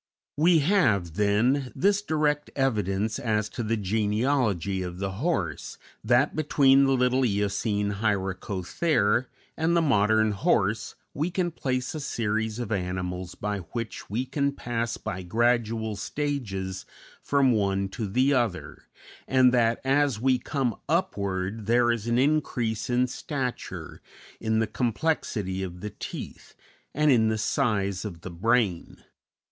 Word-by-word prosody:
We 165 Hz, +3 st, +4 dB
have, 115 Hz, -, +2 dB
then, 115 Hz, -, +1 dB
this 200 Hz, +1 st, +2 dB
direct 150 Hz, -5 st, 0 dB
evidence 110 Hz, -4 st, 0 dB
as 110 Hz, -5 st, 0 dB
to -, -, -5 dB
the 115 Hz, 0 st, 0 dB
genealogy 105 Hz, -, 0 dB
of 90 Hz, -1 st, -5 dB
the 95 Hz, 0 st, -3 dB
horse, 95 Hz, -, -2 dB, 0.3 s
that 120 Hz, +5 st, +3 dB
between 140 Hz, -3 st, +4 dB
the 135 Hz, -, +3 dB
little 125 Hz, 0 st, +2 dB
Eocene 105 Hz, -1 st, 0 dB
Hyracothere 105 Hz, -, 0 dB, 0.3 s
and 165 Hz, +2 st, +1 dB
the -, -, +4 dB
modern 110 Hz, -4 st, +3 dB
horse 100 Hz, +1 st, 0 dB, 0.2 s
we 155 Hz, +4 st, -1 dB
can 175 Hz, 0 st, -1 dB
place 130 Hz, -5 st, -2 dB
a 155 Hz, -, -4 dB
series 110 Hz, -5 st, -2 dB
of 120 Hz, -3 st, -4 dB
animals 90 Hz, -2 st, -3 dB
by 105 Hz, 0 st, -3 dB
which 110 Hz, +4 st, -6 dB
we 115 Hz, +6 st, -1 dB
can 140 Hz, +1 st, -1 dB
pass 115 Hz, -3 st, -3 dB
by 95 Hz, +1 st, -5 dB
gradual 115 Hz, +2 st, 0 dB
stages 100 Hz, -7 st, -3 dB, 0.3 s
from 140 Hz, -2 st, +3 dB
one 100 Hz, -3 st, +1 dB
to 110 Hz, +1 st, -4 dB
the 130 Hz, +8 st, +2 dB
other, 120 Hz, -9 st, -2 dB, 0.4 s
and 130 Hz, -1 st, +4 dB
that 115 Hz, -2 st, +3 dB
as 135 Hz, -3 st, +2 dB
we 130 Hz, +1 st, +2 dB
come 125 Hz, -3 st, -1 dB
upward 100 Hz, -, -1 dB
there 120 Hz, +1 st, +4 dB
is 115 Hz, -1 st, -3 dB
an 120 Hz, 0 st, +2 dB
increase 125 Hz, -6 st, 0 dB
in 125 Hz, +1 st, +3 dB
stature, 125 Hz, 0 st, -5 dB, 0.4 s
in 110 Hz, 0 st, 0 dB
the 110 Hz, -, +2 dB
complexity 115 Hz, -, -1 dB
of 90 Hz, -2 st, -6 dB
the 105 Hz, 0 st, -5 dB
teeth, -, -, -8 dB, 0.4 s
and 150 Hz, +1 st, +3 dB
in 110 Hz, -4 st, +4 dB
the 110 Hz, 0 st, 0 dB
size 105 Hz, -6 st, 0 dB
of 90 Hz, -6 st, -7 dB
the 95 Hz, -, -7 dB
brain. 100 Hz, 0 st, 0 dB
115 Hz, 140 wpm, -26 LUFS, 100-135 Hz, 0.4 s, We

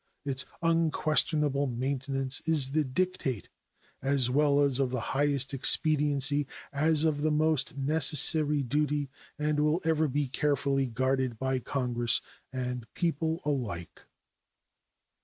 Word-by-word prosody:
Its 135 Hz, -2 st, +1 dB, 0.2 s
unquestionable 155 Hz, -3 st, +1 dB
maintenance 135 Hz, +2 st, -1 dB
is 145 Hz, -5 st, +3 dB
the 155 Hz, +1 st, +1 dB
dictate 135 Hz, -, -3 dB, 0.5 s
as 135 Hz, -2 st, +2 dB
well 145 Hz, +1 st, +2 dB
of 135 Hz, -2 st, +1 dB
the 130 Hz, 0 st, -3 dB
highest 140 Hz, -1 st, 0 dB
expediency 145 Hz, 0 st, +2 dB, 0.3 s
as 155 Hz, +2 st, +2 dB
of 150 Hz, -2 st, 0 dB
the 155 Hz, -, +1 dB
most 150 Hz, -3 st, 0 dB
necessary 150 Hz, +1 st, +4 dB
duty, 145 Hz, +1 st, -2 dB, 0.3 s
and 150 Hz, 0 st, -1 dB
will 150 Hz, +3 st, +1 dB
ever 160 Hz, -1 st, +1 dB
be 145 Hz, +1 st, -2 dB
carefully 140 Hz, -1 st, -1 dB
guarded 130 Hz, 0 st, -2 dB
by 130 Hz, +1 st, -2 dB
Congress 120 Hz, -3 st, +1 dB, 0.3 s
and 125 Hz, -2 st, -5 dB
people 165 Hz, 0 st, -2 dB
alike. 110 Hz, -, -5 dB
140 Hz, 115 wpm, -28 LUFS, 130-150 Hz, 0.5 s, necessary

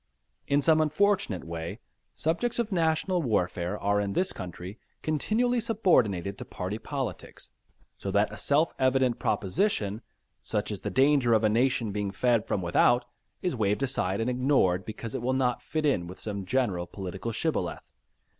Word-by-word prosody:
In 140 Hz, 0 st, +2 dB
some 160 Hz, 0 st, +5 dB
unfortunate 155 Hz, -, +1 dB
way 85 Hz, +5 st, -6 dB, 0.4 s
subjects 170 Hz, +10 st, 0 dB
of 235 Hz, -2 st, -1 dB
national 170 Hz, +1 st, +1 dB
welfare 90 Hz, -, -1 dB
are 100 Hz, +1 st, +1 dB
in 100 Hz, -1 st, -2 dB
this 185 Hz, -, +1 dB
country 90 Hz, +3 st, -8 dB, 0.2 s
continually 225 Hz, -, +1 dB
subordinated 125 Hz, -, +1 dB
to -, -, -5 dB
party 95 Hz, +4 st, -5 dB
politics, 130 Hz, -, -6 dB, 0.5 s
so 100 Hz, -, -4 dB
that 100 Hz, +2 st, +2 dB
a -, -, -7 dB
self 150 Hz, +4 st, +2 dB
evident 130 Hz, -2 st, +2 dB
proposition, 105 Hz, -, 0 dB, 0.4 s
such 105 Hz, -1 st, -2 dB
as 100 Hz, -, -4 dB
the 105 Hz, -, -3 dB
danger 130 Hz, +2 st, +4 dB
of 110 Hz, 0 st, +3 dB
a 110 Hz, -, +4 dB
nation 115 Hz, -1 st, +1 dB
being 100 Hz, 0 st, -2 dB
fed 115 Hz, +2 st, +1 dB
from 95 Hz, -, -1 dB
without, 120 Hz, +8 st, +3 dB, 0.4 s
is 180 Hz, -7 st, 0 dB
waved 105 Hz, +2 st, 0 dB
aside 100 Hz, -8 st, 0 dB
and 115 Hz, -, 0 dB
ignored, 125 Hz, -9 st, +2 dB
because 110 Hz, +1 st, -6 dB
it -, -, -3 dB
will 130 Hz, +2 st, 0 dB
not 130 Hz, -2 st, +1 dB
fit 155 Hz, -1 st, -2 dB
in 110 Hz, -12 st, +1 dB
with 90 Hz, -, -10 dB
some 100 Hz, -3 st, -5 dB
general 95 Hz, -6 st, 0 dB
political 95 Hz, +4 st, -5 dB
shibboleth. 155 Hz, +8 st, -2 dB
115 Hz, 165 wpm, -28 LUFS, 100-150 Hz, 0.5 s, some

